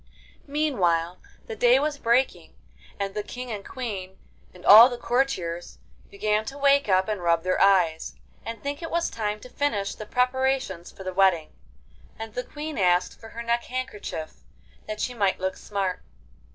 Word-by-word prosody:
Meanwhile 185 Hz, -, 0 dB, 0.3 s
the 220 Hz, -, -6 dB
day 245 Hz, +3 st, +5 dB
was 290 Hz, +1 st, -1 dB
breaking, 240 Hz, +3 st, 0 dB, 0.4 s
and 195 Hz, -1 st, -2 dB
the 210 Hz, -, -2 dB
King 250 Hz, +3 st, -7 dB
and 205 Hz, -2 st, -5 dB
Queen 200 Hz, -8 st, -6 dB, 0.3 s
and 180 Hz, -, -15 dB
all 225 Hz, +5 st, +10 dB
the 245 Hz, -, -5 dB
courtiers 235 Hz, -10 st, -1 dB, 0.3 s
began 210 Hz, +1 st, 0 dB
to 275 Hz, +4 st, -7 dB
wake 280 Hz, -3 st, +3 dB
up 185 Hz, 0 st, +3 dB
and 210 Hz, -3 st, -2 dB
rub 170 Hz, -1 st, +2 dB
their 185 Hz, 0 st, 0 dB
eyes, 180 Hz, -5 st, +3 dB, 0.3 s
and 230 Hz, 0 st, -7 dB
think 285 Hz, +2 st, -4 dB
it 330 Hz, -, -5 dB
was 340 Hz, 0 st, -1 dB
time 210 Hz, -1 st, -3 dB
to -, -, -10 dB
finish 225 Hz, -8 st, -1 dB
the 215 Hz, -, -9 dB
preparations 250 Hz, -8 st, 0 dB
for 190 Hz, -, -11 dB
the 185 Hz, 0 st, -4 dB
wedding. 180 Hz, -4 st, +3 dB, 0.7 s
And 225 Hz, -1 st, -7 dB
the 250 Hz, -, -2 dB
Queen 300 Hz, +1 st, -6 dB
asked 180 Hz, -1 st, +2 dB
for 225 Hz, -, -11 dB
her 235 Hz, +1 st, -7 dB
neck 235 Hz, 0 st, 0 dB
handkerchief, 215 Hz, -10 st, -5 dB, 0.5 s
that 215 Hz, 0 st, -5 dB
she 250 Hz, -, -2 dB
might 200 Hz, -5 st, 0 dB
look 190 Hz, 0 st, -2 dB
smart. 195 Hz, -3 st, -3 dB
215 Hz, 170 wpm, -25 LUFS, 185-255 Hz, 0.7 s, all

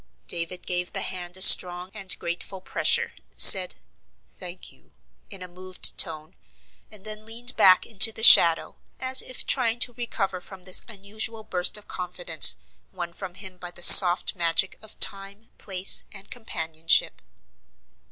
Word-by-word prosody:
David 170 Hz, +1 st, -5 dB
gave 180 Hz, 0 st, -6 dB
the -, -, -6 dB
hand 180 Hz, 0 st, -8 dB
a 190 Hz, -, +2 dB
strong 180 Hz, 0 st, +5 dB
and 195 Hz, -4 st, -3 dB
grateful 175 Hz, +3 st, -9 dB
pressure, 185 Hz, -, -4 dB, 0.2 s
said, 185 Hz, -2 st, +7 dB, 0.6 s
"Thank 180 Hz, 0 st, -12 dB
you," -, -, -26 dB, 0.4 s
in 185 Hz, -, -11 dB
a -, -, -11 dB
moved 185 Hz, +1 st, -4 dB
tone, 155 Hz, -3 st, -7 dB, 0.6 s
and 210 Hz, -2 st, -15 dB
then 215 Hz, 0 st, -7 dB
leaned 235 Hz, +3 st, -5 dB
back 185 Hz, -1 st, +1 dB
into 225 Hz, 0 st, +3 dB
the 220 Hz, 0 st, -7 dB
shadow, 165 Hz, -6 st, +4 dB, 0.2 s
as 260 Hz, 0 st, +1 dB
if 255 Hz, -, -7 dB
trying 240 Hz, -3 st, -3 dB
to 245 Hz, -, 0 dB
recover 195 Hz, -6 st, -7 dB
from 190 Hz, 0 st, -15 dB
this 185 Hz, 0 st, -2 dB
unusual 220 Hz, +1 st, -9 dB
burst 180 Hz, 0 st, -3 dB
of 210 Hz, -, -17 dB
confidence, 175 Hz, -4 st, +1 dB, 0.4 s
won 175 Hz, -2 st, -10 dB
from 180 Hz, 0 st, -12 dB
him 185 Hz, -2 st, -13 dB
by 175 Hz, -, -11 dB
the 175 Hz, 0 st, -12 dB
soft 180 Hz, +2 st, +7 dB
magic 170 Hz, +2 st, -4 dB
of 215 Hz, 0 st, -17 dB
time, 200 Hz, +3 st, -3 dB
place, 190 Hz, -1 st, -1 dB
and 195 Hz, -1 st, -13 dB
companionship. 165 Hz, -8 st, -4 dB
185 Hz, 150 wpm, -21 LUFS, 175-215 Hz, 0.6 s, said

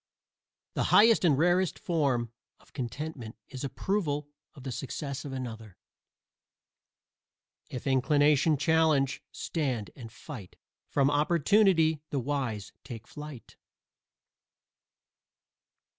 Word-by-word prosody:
The -, -, 0 dB
highest 225 Hz, -1 st, +6 dB
and 155 Hz, -6 st, +4 dB
rarest 175 Hz, +2 st, +2 dB
form 135 Hz, -9 st, 0 dB, 0.3 s
of -, -, -25 dB
contentment 130 Hz, -2 st, -5 dB
is 130 Hz, -, -7 dB
approval 150 Hz, -1 st, -1 dB, 0.3 s
of 135 Hz, -, -12 dB
the 130 Hz, -, -4 dB
success 140 Hz, +3 st, -5 dB
of 140 Hz, -, -5 dB
another. 115 Hz, -7 st, -7 dB, 1.9 s
If 125 Hz, -, -6 dB
Inclination 145 Hz, +3 st, +3 dB
challenge, 150 Hz, -2 st, +2 dB
stand 130 Hz, -10 st, -3 dB
and 115 Hz, -4 st, -10 dB
fight 110 Hz, -, -10 dB, 0.3 s
From 140 Hz, 0 st, +2 dB
Opportunity 160 Hz, +1 st, +3 dB
the 145 Hz, -, -2 dB
wise 120 Hz, -7 st, -3 dB
take 120 Hz, -3 st, -8 dB
flight. 150 Hz, -3 st, -10 dB
140 Hz, 100 wpm, -29 LUFS, 125-160 Hz, 1.9 s, highest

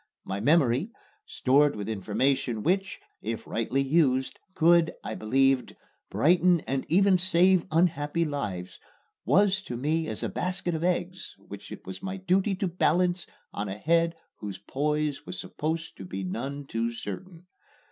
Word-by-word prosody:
My 95 Hz, +1 st, -3 dB
memory, 140 Hz, -, +3 dB, 0.4 s
stored 140 Hz, +3 st, +3 dB
with 105 Hz, -1 st, -5 dB
information 115 Hz, +2 st, 0 dB
which, 190 Hz, +2 st, 0 dB, 0.2 s
if 115 Hz, +1 st, -4 dB
rightly 125 Hz, +4 st, -1 dB
used, 135 Hz, -3 st, +1 dB, 0.2 s
could, 170 Hz, 0 st, +4 dB
I -, -, -4 dB
believed, 135 Hz, +3 st, +1 dB, 0.3 s
brighten 175 Hz, +1 st, +3 dB
and 135 Hz, 0 st, -3 dB
even 190 Hz, +2 st, +4 dB
save 180 Hz, 0 st, +3 dB
unhappy 165 Hz, -1 st, +1 dB
lives, 105 Hz, -, -4 dB, 0.5 s
was 200 Hz, 0 st, +3 dB
to 125 Hz, -10 st, -6 dB
me 155 Hz, +5 st, 0 dB
as -, -, -4 dB
a -, -, 0 dB
basket 180 Hz, -1 st, -2 dB
of 160 Hz, 0 st, -2 dB
eggs 180 Hz, +1 st, -2 dB
which -, -, -11 dB
it -, -, -9 dB
was 95 Hz, -, -7 dB
my 190 Hz, 0 st, -4 dB
duty 190 Hz, +2 st, +1 dB
to 190 Hz, +1 st, -1 dB
balance 180 Hz, 0 st, +1 dB, 0.3 s
on 100 Hz, 0 st, -3 dB
a 95 Hz, -, -5 dB
head 165 Hz, +6 st, +2 dB, 0.2 s
whose 100 Hz, -2 st, -6 dB
poise 150 Hz, +5 st, -1 dB
was 180 Hz, -, -6 dB
supposed 160 Hz, +2 st, -4 dB
to -, -, -8 dB
be 95 Hz, +1 st, -5 dB
none 135 Hz, +9 st, -4 dB
too 115 Hz, -2 st, -2 dB
certain. 165 Hz, -, -8 dB
150 Hz, 150 wpm, -27 LUFS, 125-180 Hz, 0.5 s, could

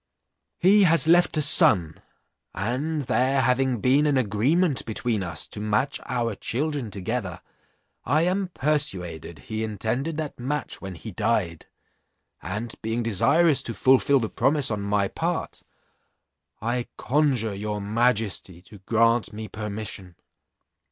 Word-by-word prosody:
"'He 200 Hz, +4 st, +5 dB
has 165 Hz, -2 st, +4 dB
left 175 Hz, -1 st, +4 dB
a 155 Hz, -, +2 dB
son, 90 Hz, -, +4 dB, 0.5 s
and 135 Hz, -, -2 dB
there 130 Hz, +2 st, +1 dB
having 125 Hz, 0 st, +1 dB
been 140 Hz, +4 st, +3 dB
an 145 Hz, -2 st, +2 dB
agreement 130 Hz, -, +1 dB
between 110 Hz, -1 st, -2 dB
us 85 Hz, -4 st, -4 dB
to -, -, -5 dB
match 110 Hz, +6 st, 0 dB
our 120 Hz, -3 st, -1 dB
children 140 Hz, +3 st, -3 dB
together, 95 Hz, -2 st, -4 dB, 0.6 s
I 150 Hz, +6 st, +2 dB
am 185 Hz, +2 st, 0 dB
persuaded 130 Hz, -, -2 dB
he 110 Hz, 0 st, -5 dB
intended 110 Hz, -, -3 dB
that 155 Hz, -4 st, -5 dB
match 140 Hz, +2 st, -4 dB
when 95 Hz, -2 st, -7 dB
he 110 Hz, +6 st, -9 dB
died; 100 Hz, -5 st, -1 dB, 0.7 s
and 105 Hz, +7 st, -5 dB
being 115 Hz, +2 st, -2 dB
desirous 140 Hz, -, +3 dB
to 115 Hz, -, -6 dB
fulfil 135 Hz, +1 st, +4 dB
the 115 Hz, -, -2 dB
promise 135 Hz, +3 st, +1 dB
on 105 Hz, -1 st, -2 dB
my 100 Hz, 0 st, 0 dB
part, -, -, -3 dB, 1.0 s
I 120 Hz, +1 st, -1 dB
conjure 130 Hz, -7 st, +1 dB
your 105 Hz, +1 st, -4 dB
majesty 105 Hz, -4 st, -1 dB
to 105 Hz, 0 st, -15 dB
grant 115 Hz, +3 st, +1 dB
me 110 Hz, 0 st, -7 dB
permission.' 105 Hz, -3 st, -6 dB
115 Hz, 130 wpm, -25 LUFS, 105-140 Hz, 1.0 s, He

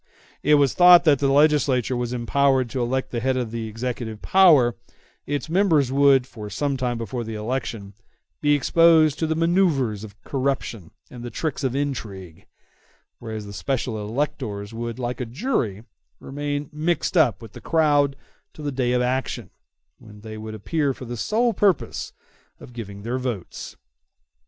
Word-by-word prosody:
It 150 Hz, +1 st, +4 dB
was 140 Hz, -3 st, +3 dB
thought 180 Hz, -1 st, +8 dB
that 160 Hz, -, +5 dB
if 140 Hz, -, +2 dB
the 140 Hz, -1 st, +2 dB
legislature 140 Hz, -4 st, +3 dB
was 120 Hz, -1 st, -2 dB
empowered 130 Hz, +1 st, +1 dB
to 130 Hz, -, -2 dB
elect 130 Hz, +2 st, -1 dB
the 120 Hz, -, -2 dB
head 130 Hz, +2 st, 0 dB
of 120 Hz, -3 st, -3 dB
the 115 Hz, -1 st, -4 dB
executive 115 Hz, -1 st, -5 dB
power, 150 Hz, -, +5 dB, 0.5 s
its 145 Hz, 0 st, -2 dB
members 160 Hz, -7 st, +2 dB
would, 135 Hz, -2 st, +4 dB
for 105 Hz, -5 st, -9 dB
some 140 Hz, +7 st, -1 dB
time 125 Hz, -2 st, -2 dB
before 115 Hz, +2 st, -4 dB
the 110 Hz, -1 st, -6 dB
election, 110 Hz, -3 st, -4 dB, 0.5 s
be 145 Hz, 0 st, +4 dB
exposed 160 Hz, +1 st, +4 dB
to 160 Hz, -, 0 dB
the 160 Hz, -, 0 dB
manoeuvres 160 Hz, -, +1 dB
of 105 Hz, 0 st, -11 dB
corruption 130 Hz, -, -2 dB, 0.2 s
and 125 Hz, -, -9 dB
the 120 Hz, -, -6 dB
tricks 150 Hz, +2 st, -3 dB
of 130 Hz, -1 st, -1 dB
intrigue; 100 Hz, -, -5 dB, 0.7 s
whereas 110 Hz, -2 st, -6 dB
the 100 Hz, -, -9 dB
special 110 Hz, +4 st, -2 dB
electors 105 Hz, -3 st, -3 dB
would, 115 Hz, 0 st, -5 dB
like 125 Hz, 0 st, -4 dB
a -, -, -2 dB
jury, 115 Hz, -, -2 dB, 0.4 s
remain 145 Hz, +1 st, -4 dB
mixed 165 Hz, +5 st, -1 dB
up 130 Hz, -, +4 dB
with 115 Hz, -3 st, -11 dB
the -, -, -11 dB
crowd 145 Hz, -4 st, +2 dB, 0.4 s
till 150 Hz, -, -9 dB
the 145 Hz, -, -1 dB
day 125 Hz, -2 st, 0 dB
of 125 Hz, 0 st, +2 dB
action, 130 Hz, 0 st, -2 dB, 0.5 s
when 105 Hz, -2 st, -14 dB
they 110 Hz, 0 st, -8 dB
would 110 Hz, 0 st, -7 dB
appear 140 Hz, +5 st, -1 dB
for 130 Hz, -, -9 dB
the 120 Hz, 0 st, -5 dB
sole 230 Hz, -, +1 dB
purpose 195 Hz, -2 st, 0 dB, 0.5 s
of 125 Hz, -, -13 dB
giving 100 Hz, -4 st, -8 dB
their 120 Hz, +3 st, -2 dB
votes. 120 Hz, -8 st, -5 dB
130 Hz, 170 wpm, -23 LUFS, 115-145 Hz, 0.7 s, thought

